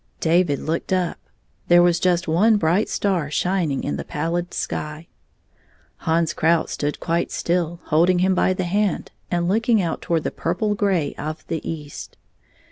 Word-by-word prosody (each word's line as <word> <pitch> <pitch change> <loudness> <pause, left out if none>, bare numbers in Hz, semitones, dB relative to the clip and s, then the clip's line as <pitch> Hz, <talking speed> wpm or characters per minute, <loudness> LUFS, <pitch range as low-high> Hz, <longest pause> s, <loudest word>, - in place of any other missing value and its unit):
David 165 -3 +2
looked 165 +6 -3
up. 180 -2 0 0.5
There 175 0 +6
was 175 -1 +3
just 180 -1 +1
one 210 +8 +4
bright 175 +4 +1
star 180 -8 0
shining 170 -3 0
in 70 - -2
the 70 - -4
pallid 170 - -2
sky. 150 +2 -4 0.9
Hans 165 0 0
Krout 165 +1 +2
stood 145 0 -3
quite 170 0 -1
still, 170 -1 -1
holding 170 +4 +3
him 185 +2 +3
by 185 - +2
the 185 - -2
hand, 200 +3 -1 0.2
and 175 -1 0
looking 225 +4 +2
out 170 -4 -2
toward 165 -2 0
the - - -2
purple 185 +5 -1
gray 195 -8 0
of 155 +1 -5
the 160 - -2
east. 150 -3 -7
170 Hz, 160 wpm, -22 LUFS, 160-185 Hz, 0.9 s, There